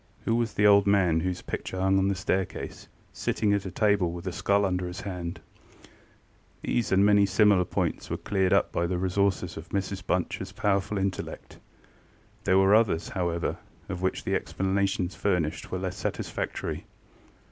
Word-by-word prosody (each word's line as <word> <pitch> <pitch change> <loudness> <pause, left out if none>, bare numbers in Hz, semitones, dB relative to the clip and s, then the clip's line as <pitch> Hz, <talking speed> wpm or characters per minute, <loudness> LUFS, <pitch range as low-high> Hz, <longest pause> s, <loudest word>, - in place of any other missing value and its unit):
Who 115 - +2
was 115 -2 0
the 105 - +3
old 100 -1 +6
man 90 -5 +3
whose 90 +1 -3
picture 95 - -5
hung 95 +1 +3
on 95 - +2
the 100 - +1
staircase, 95 +1 -3 0.3
sitting 105 -2 0
at 100 -1 -1
a - - -3
table, 100 -2 +2
with 85 +1 -7
a 95 - -2
skull 100 +3 +2
under 90 -1 -1
his 90 +3 -6
hand? 90 -4 -5 0.2
ŌĆØ - - -23 0.8
These 120 -3 0
and 95 +1 +5
many 100 -1 +5
similar 100 -1 +4
points - - -2
were - - -2
cleared 95 -2 0
up - - +3
by 85 - 0
the 90 0 -1
resources 95 -1 0
of 80 - -9
Mrs 100 -1 -2
BunchŌĆÖs - - -2
powerful 100 +1 0
intellect. 95 -1 -4 0.9
There 95 - +4
were 95 +1 +5
others, 105 -7 +3
however, 85 -3 -1 0.3
of 90 -2 -4
which 95 - -1
the - - -2
explanations 95 -1 0
furnished 90 -7 -1
were - - -1
less - - -4
satisfactory. - - -4
95 Hz, 170 wpm, -27 LUFS, 90-100 Hz, 0.9 s, old